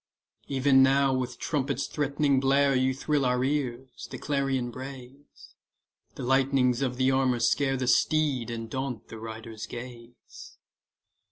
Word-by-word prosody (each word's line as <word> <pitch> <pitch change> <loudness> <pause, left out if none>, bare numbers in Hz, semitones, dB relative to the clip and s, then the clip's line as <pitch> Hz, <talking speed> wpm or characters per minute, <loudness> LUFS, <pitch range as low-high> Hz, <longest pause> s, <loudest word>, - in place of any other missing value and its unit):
E'en 135 0 +4
now 135 0 +4
with 130 -1 -3
trumpet's 140 -3 -2
threatening 145 -1 +1
blare 135 +1 +3
You 130 +1 +2
thrill 140 +2 -1
our 125 0 +1
ears; 130 -2 -3
the - - -6
clarion 135 -4 -1
brays; 130 +2 -11 0.6
The - - -6
lightnings 130 -1 +2
of 125 -2 -1
the 130 +1 +3
armour 130 -2 +2
scare 135 +3 +1
The 130 - -2
steed, 140 -4 +2
and 115 -1 -5
daunt 130 -2 -5
the 115 - -9
rider's 110 0 -8
gaze. 120 0 -11
130 Hz, 140 wpm, -27 LUFS, 125-140 Hz, 0.6 s, E'en